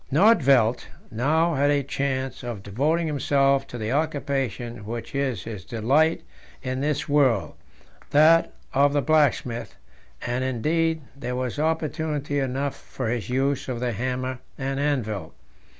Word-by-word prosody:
Nödtvedt 140 - +4 0.3
now 155 +9 +2
had 145 0 +2
a 145 -1 +2
chance 135 -1 -2
of 120 -5 -6
devoting 150 - 0
himself 140 -2 +2
to 120 - -7
the 110 0 -3
occupation 135 -7 -2
which 115 +2 -6
is 130 -9 -1
his 105 -5 -7
delight 135 - +2 0.4
in 130 0 -2
this 150 0 -1
world 130 - +2 0.6
that 160 +3 +5 0.2
of 140 +1 +4
the 145 -1 +1
blacksmith; 145 -6 +1 0.5
and, 125 +1 -1
indeed, 160 +6 0
there 125 -3 -4
was 130 +2 -3
opportunity 155 -2 -1
enough 135 +1 -1
for 125 -4 -5
his 120 -1 -2
use 135 +2 0
of 125 -2 -3
the 125 0 -1
hammer 130 +3 -3 0.2
and 135 0 -2
anvil. 125 -9 -2
135 Hz, 135 wpm, -25 LUFS, 125-150 Hz, 0.6 s, that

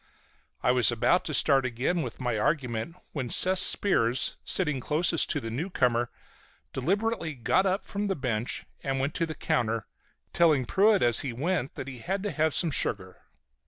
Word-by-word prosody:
I - - +4
was 125 -1 +4
about 120 +10 +1
to 155 - -4
start 135 -2 +4
again 130 +8 -1
with - - -6
my 125 -3 -2
argument 130 +2 -2 0.2
when 130 -5 -4
Seth 185 +7 +3
Spears, 130 - +2
sitting 150 -8 0
closest 160 +5 +1
to 145 - 0
the 115 -4 -6
newcomer, 125 -5 0 0.6
deliberately 185 - -1
got 185 +10 +1
up 190 +2 -1
from 205 +1 -3
the 195 - -1
bench 120 -5 -3 0.2
and 135 -1 -2
went 140 +3 -1
to 165 - -1
the 160 - -6
counter, 115 -4 -1 0.5
telling 155 -7 +3
Pruett 200 - +3
as 120 -1 +5
he 130 -4 -2
went 145 +1 -2
that 130 - -6
he 130 -3 -8
had 190 - -3
to 205 - -2
have 155 -1 0
some 170 -3 +2
sugar. 95 -8 -2
140 Hz, 175 wpm, -27 LUFS, 120-180 Hz, 0.6 s, as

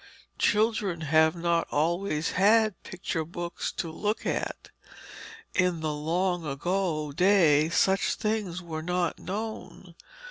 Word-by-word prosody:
Children 210 -5 +1
have 160 +2 +3
not 170 -1 0
always 165 +1 0
had 215 +1 +3
picture 175 -3 -4
books 170 +2 -5
to 165 - -4
look 210 +6 -2
at. - - -3 0.8
In 180 -3 +1
the 155 -1 -1
long 175 +4 -1
ago 155 +1 -1
days 165 -3 +4
such 195 0 +2
things 210 -5 -2
were 160 -2 -5
not 180 +1 -1
known. 200 -2 -6
175 Hz, 115 wpm, -27 LUFS, 160-195 Hz, 0.8 s, days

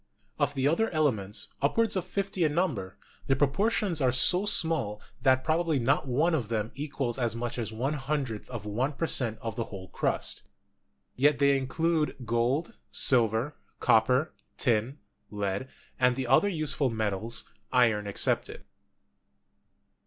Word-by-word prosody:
Of 145 0 +1
the 135 0 +1
other 225 +9 +2
elements,, 110 - -1
upward 220 +11 +2
of 185 -2 -1
fifty 195 -1 -2
in 150 -2 +1
number, 125 - -1 0.3
the 135 - +3
proportions 170 - +1
are 130 -2 +3
so 180 +10 +4
small 145 - +1 0.2
that 130 -1 +3
probably 160 -1 +1
not 135 +3 +1
one 150 +7 +2
of 130 -9 0
them 110 -1 -2
equals 140 -3 -3
as 120 -3 0
much 120 +1 -3
as 110 -2 -3
one 125 +7 -2
hundredth 135 -6 -3
of 120 -5 -6
one 125 +8 -1
per 165 - -2
cent, 115 -8 +1
of 115 -2 -4
the 115 - -2
whole 95 -4 -9
crust. - - -1 0.7
Yet 145 +2 +3
they 140 -1 +4
include 155 +4 0
gold, 120 +7 0
silver, 120 +3 +2 0.2
copper, 125 +7 +3 0.2
tin, 120 +2 +1 0.3
lead 105 +4 -3 0.3
and 125 -1 +4
the 130 0 -2
other 205 +11 +4
useful 150 -6 0
metals, 110 0 -2 0.2
iron 115 -5 +3
excepted. 100 - -1
130 Hz, 145 wpm, -28 LUFS, 115-155 Hz, 0.7 s, so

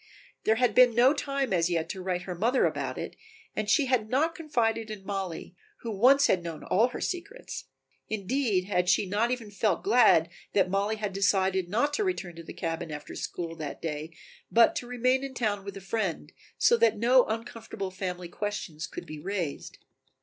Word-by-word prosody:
There 220 - +4
had 250 +1 +2
been 250 -2 +6
no 250 +4 +6
time 275 -5 -2
as 170 -1 +2
yet 165 -2 0
to 190 - -5
write 180 -1 -2
her 185 - -5
mother 230 +9 +2
about - - -2
it - - -5 0.4
and 215 -1 -2
she 290 +3 +4
had 250 -5 +1
not 310 +7 +2
confided 230 -9 -1
in 205 -3 -8
Mollie, 190 -3 -4 0.3
who 230 - -4
once 255 +7 +5
had 185 - +3
known 165 -2 -7
all 220 +6 +3
her 250 - -7
secrets. 405 +7 -5 0.4
Indeed, 215 -1 0
had 180 -2 +1
she 190 - +3
not 210 +5 +1
even 240 -4 -3
felt 205 -2 0
glad 210 -7 +5 0.2
that 185 -2 +2
Mollie 200 +2 +1
had 210 -2 -4
decided 190 -2 +1
not 285 +9 +1
to 420 - +1
return 195 - -3
to 165 - -8
the - - -9
cabin 165 -1 -4
after 150 -1 -7
school 165 -1 -5
that 150 -3 -6
day 155 -1 -4 0.4
but 230 0 +5
to 245 - -4
remain 255 +2 +1
in 270 -1 -6
town 210 -5 -1
with 200 0 -7
a - - -8
friend, 195 -2 -2 0.3
so 475 - +5
that 465 - +3
no 245 +3 +5
uncomfortable 225 -3 -5
family 180 -2 -4
questions 175 -4 -4
could - - -8
be 155 -1 -8
raised. 180 -4 -4
205 Hz, 195 wpm, -28 LUFS, 180-245 Hz, 0.4 s, been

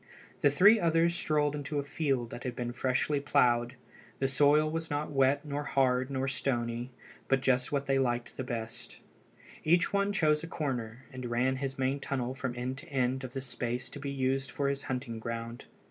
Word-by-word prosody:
The 145 - +5
three 200 +10 +6
others 170 -1 +3
strolled 150 -3 +1
into 145 0 -4
a 140 - 0
field 135 -5 -1
that 120 - -7
had 125 -1 -3
been 120 -1 -3
freshly 130 +4 +1
ploughed. 125 -4 +2 0.4
The 135 - +1
soil 145 +3 +4
was 160 +1 -3
not 145 0 -2
wet 135 +1 +3
nor 145 0 -3
hard 130 -2 +2
nor 135 -1 -1
stony, 120 -2 -2 0.4
but 135 -1 +2
just 125 -1 +2
what 140 -1 0
they 135 -1 +2
liked 120 -2 -1
best. 115 -2 -5 0.7
Each 170 +4 +3
one 200 0 +2
chose 150 -5 +2
a - - -5
corner, 130 -7 -4
and 130 -1 -5
ran 125 +3 +1
his 135 0 -3
main 135 +1 0
tunnel 130 -2 -2
from 130 -2 -4
end 130 +2 -3
to - - -13
end 130 -1 0
of 130 -1 -6
the 135 - -3
space 125 -1 -4
to 145 - -8
be 140 0 -4
used 135 0 0
for 140 -1 -1
his 140 0 -1
hunting 125 -3 -3
ground. 115 +1 -5
135 Hz, 190 wpm, -31 LUFS, 125-145 Hz, 0.7 s, three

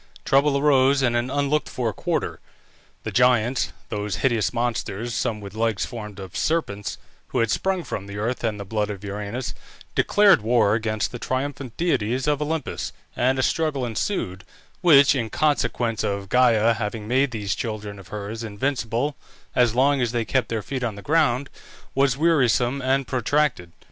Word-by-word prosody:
Trouble 140 +1 +3
arose 140 -1 +4
in 120 -2 +2
an 120 +1 0
unlooked 145 +2 0
for 115 -4 -2
quarter. - - -2 0.6
The - - -4
Giants, 125 0 +3 0.2
those 105 -3 -2
hideous 115 -5 +2
monsters 120 -2 -2
(some 110 -1 -1
with 100 -2 -9
legs 110 -2 0
formed 105 -4 -8
of 95 -3 -9
serpents) 105 -11 -1 0.3
who - - -4
had 115 -2 +2
sprung 190 -2 0
from 100 -7 -5
the 100 0 -7
earth 115 +5 -2
and 110 -3 -1
the 100 - -5
blood 105 +1 -1
of 100 -1 -6
Uranus, 105 +5 -4 0.4
declared 205 - +5
war 110 -2 +3
against 110 -1 -1
the 120 - -6
triumphant 130 -1 -3
deities 130 -7 0
of 150 -1 +1
Olympus, 155 -1 -3 0.2
and 130 +2 +2
a 130 - +1
struggle 155 -5 0
ensued, 110 - -2 0.4
which, 145 -7 +7
in 115 -5 -2
consequence 120 -6 0
of 100 -1 -2
Gæa 115 -2 +4
having 105 -1 -4
made 135 +4 +2
these 105 -5 -2
children 105 -3 -5
of 95 - -13
hers 105 +2 -6
invincible 120 +4 -1 0.4
as 120 -2 +3
long 135 +1 +3
as 120 -1 0
they 120 -2 0
kept 130 +3 0
their 110 -2 -2
feet 130 +2 -4
on 115 -4 -2
the 100 - -10
ground, 140 -4 +2 0.5
was 135 -1 +2
wearisome 135 -5 +2
and 135 +1 +1
protracted. 130 - 0
120 Hz, 170 wpm, -24 LUFS, 110-135 Hz, 0.6 s, which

